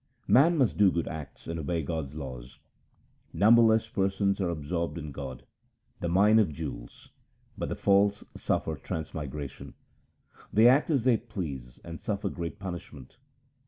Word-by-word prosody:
Man 160 +6 +5
must 130 -6 +2
do 100 -2 +5
good 85 - -2
acts 80 -3 -8
and 85 0 -4
obey 80 +2 -2
God's 75 -2 -4
laws: 65 -5 -8 0.4
— - - -38
Numberless 110 0 +6
persons 100 -1 0
are 90 - 0
absorbed 85 +2 -3
in 75 -3 -6
God, 65 -2 -7 0.6
the 85 - -2
Mine 105 +5 +5
of 100 -7 +2
jewels; - - -8 0.4
but - - -4
the - - -2
false 100 +1 +3
suffer - - -1
transmigration: 75 -3 -6 0.8
They 110 +3 +6
act 135 +6 +4
as 140 -7 +2
they 125 -2 +4
please 75 - -7
and 85 -1 -8
suffer 100 -2 -2
great 85 0 -5
punishment. 85 - -8
85 Hz, 150 wpm, -28 LUFS, 75-105 Hz, 0.8 s, Numberless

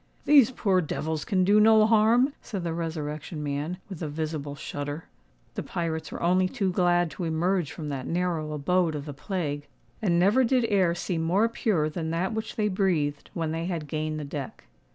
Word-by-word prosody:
"These 280 -5 +7
poor 195 -7 +1
devils 155 -1 -3
can 185 -2 +1
do 205 +3 +5
no 215 0 +6
harm," 230 +5 +4
said 195 -6 -5
the 170 -1 -2
Resurrection 155 -1 -4
Man, 145 +5 -3
with 190 -5 -8
a 160 - -2
visible 150 -1 -4
shudder. 145 +2 -5 0.5
The - - -3
pirates 160 -2 -3
were - - -5
only 185 +2 +3
too 195 -6 -1
glad 175 -2 +2
to 180 - -6
emerge 170 0 0
from 150 -2 -6
that 135 -2 -4
narrow 170 -3 -1
abode 160 +2 +1
of 145 -1 -5
the 145 - -6
plague; 150 -2 -3 0.3
and 175 -5 +2
never 205 +9 +4
did 250 0 +2
air 185 -5 +3
seem 175 -2 -2
more 185 +7 +3
pure 210 -9 0
than 160 +1 -4
that 175 +6 -1
which 220 0 -4
they 210 -1 +1
breathed 175 -8 0
when 165 -2 -1
they 165 +1 -2
had 170 -4 -3
gained 155 +1 -2
the 150 - -5
deck. 140 -2 -6
170 Hz, 195 wpm, -27 LUFS, 155-195 Hz, 0.5 s, These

